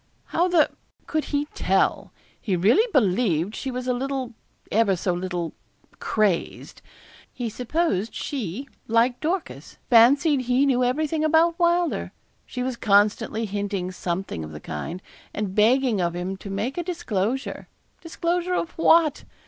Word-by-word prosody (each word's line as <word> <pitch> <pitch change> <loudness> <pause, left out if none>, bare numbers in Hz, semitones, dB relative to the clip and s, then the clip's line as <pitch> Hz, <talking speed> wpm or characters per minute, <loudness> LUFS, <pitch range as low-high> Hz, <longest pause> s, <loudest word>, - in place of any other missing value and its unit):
'How 345 +2 +2
the 345 -4 +3 0.3
could 310 -1 -1
he 290 0 -1
tell? - - +1 0.3
He 195 - 0
really 235 - +3
believed 200 - +2
she 270 - -4
was 250 -1 -4
a 250 - +2
little 260 -1 -3 0.4
ever 210 -3 +3
so 180 +1 -1
little 175 -2 -3 0.5
crazed. 210 -6 -1 0.5
He 240 -2 -4
supposed 245 - -1
she, 255 - -4 0.2
like 230 +2 +2
Dorcas, 340 +3 -4
fancied 270 +5 +5
he 250 +3 +3
knew 255 -2 +2
everything 305 +5 0
about 325 +2 +3
Wylder. 345 0 +1 0.3
She 250 - -4
was 255 -1 -3
constantly 210 +2 +2
hinting 200 -2 -3
something 175 - -4
of 75 0 -8
the 75 - -7
kind; 165 - -6 0.3
and 205 -3 -3
begging 230 0 +3
of 170 0 -1
him 180 +2 -3
to 200 - -9
make 215 - -3
a - - -1
disclosure 260 - -3 0.3
disclosure 345 +2 -1
of 335 - -2
what? 325 -3 +4
245 Hz, 140 wpm, -24 LUFS, 195-305 Hz, 0.5 s, fancied